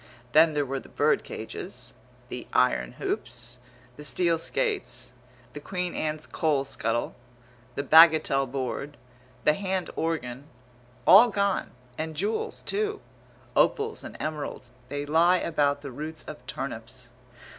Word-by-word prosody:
Then 155 +3 +6
there 145 -1 +1
were 135 0 -3
the - - -15
bird - - +2
cages, - - -7 0.4
the - - -6
iron 60 -1 +2
hoops, 120 +1 -4 0.4
the 150 - -9
steel 170 +2 +1
skates, 145 - -2 0.4
the 150 - -6
Queen 180 +3 -3
Anne 155 0 -1
coal 145 -4 +1
scuttle, 120 -3 -2 0.6
the 140 - -1
bagatelle 155 -3 +6
board, 135 +2 -4 0.5
the 150 - +5
hand 190 0 -2
organ 140 -5 -2 0.6
all 230 +5 +9
gone, 200 -2 0 0.3
and 160 0 -3
jewels, 205 +8 -2
too. 425 +1 -1 0.6
Opals 440 +1 +2
and - - -8
emeralds, 150 -5 -4 0.2
they 145 +1 -3
lie 165 +4 +4
about 145 -4 +1
the 140 - -6
roots 155 +5 -5
of 120 - -9
turnips. 125 -2 -5
150 Hz, 130 wpm, -27 LUFS, 135-170 Hz, 0.6 s, all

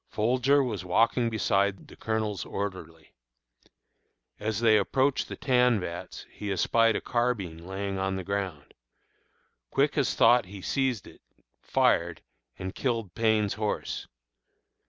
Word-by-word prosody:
Folger 130 +6 +2
was 110 -7 -3
walking 115 +6 +2
beside 100 -3 0
the - - -14
Colonel's 110 -4 -2
orderly. 95 -5 -6 1.3
As 110 0 -2
they 110 -2 +5
approached 130 +7 +1
the - - -5
tan 125 -4 +3
vats 85 -1 -7
he 105 -1 -5
espied 115 +4 +3
a - - -1
carbine 120 -9 -1
lying 95 +2 -4
on 95 0 -1
the 95 - -4
ground. 95 -6 -4 1.0
Quick - - +1
as - - +1
thought 120 -2 +5
he 100 +1 -9
seized 130 -7 0
it, - - -15 0.4
fired, - - +1 0.3
and 95 +1 -5
killed 115 -8 -2
Payne's 110 -3 +2
horse. 105 -1 -3
105 Hz, 130 wpm, -28 LUFS, 95-120 Hz, 1.3 s, they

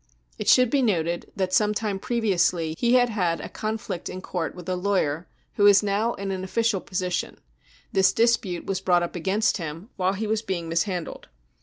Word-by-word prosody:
It - - -4
should 250 -2 +5
be 280 - +3
noted 170 -7 0
that 190 -2 -1
some 210 +1 +3
time 205 -3 -2
previ 225 -2 0
ously 170 -2 +1
he 240 +7 +2
had 245 -1 +4
had 180 -7 0
a - - -6
conflict 215 -4 -4
in 185 - -6
court 175 -3 -4
with 180 -2 -10
a 185 - 0
lawyer 180 -4 0 0.3
who 205 - +6
is 205 0 +6
now 210 +3 0
in 195 0 -4
an 185 -1 -3
official 215 0 0
position; 180 -1 -3 0.6
this 190 -1 +4
dispute 225 -6 +1
was 190 -1 -2
brought 175 -2 +3
up 175 - -5
against 195 +6 +1
him 165 - -7
while 185 0 +1
he 210 +3 -3
was 215 0 0
being 185 -6 -3
mishandled. 170 +1 -2
190 Hz, 195 wpm, -25 LUFS, 180-215 Hz, 0.6 s, who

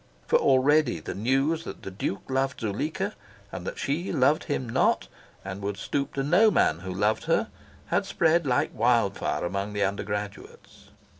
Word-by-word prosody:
For - - +3
already 135 - +3
the 80 - -6
news 135 +9 +1
that - - -9
the 95 - -6
Duke 95 +1 -3
loved 135 0 -1
Zuleika, 115 +9 -2 0.4
and - - -6
that - - -5
she 155 +7 -2
loved 140 +4 +2
him 130 - -2
not, 115 - +2 0.4
and 95 +1 -6
would 100 0 -3
stoop 140 +6 -3
to 135 - 0
no 180 +10 +5
man 85 - +2
who 95 +1 -6
loved 105 +4 0
her, - - +1 0.4
had - - 0
spread 165 -1 +2
like 125 - +1
wild 115 -3 +2
fire - - -2
among 100 +3 -3
the 100 -1 0
undergraduates. 100 +1 -5
120 Hz, 170 wpm, -27 LUFS, 100-140 Hz, 0.4 s, no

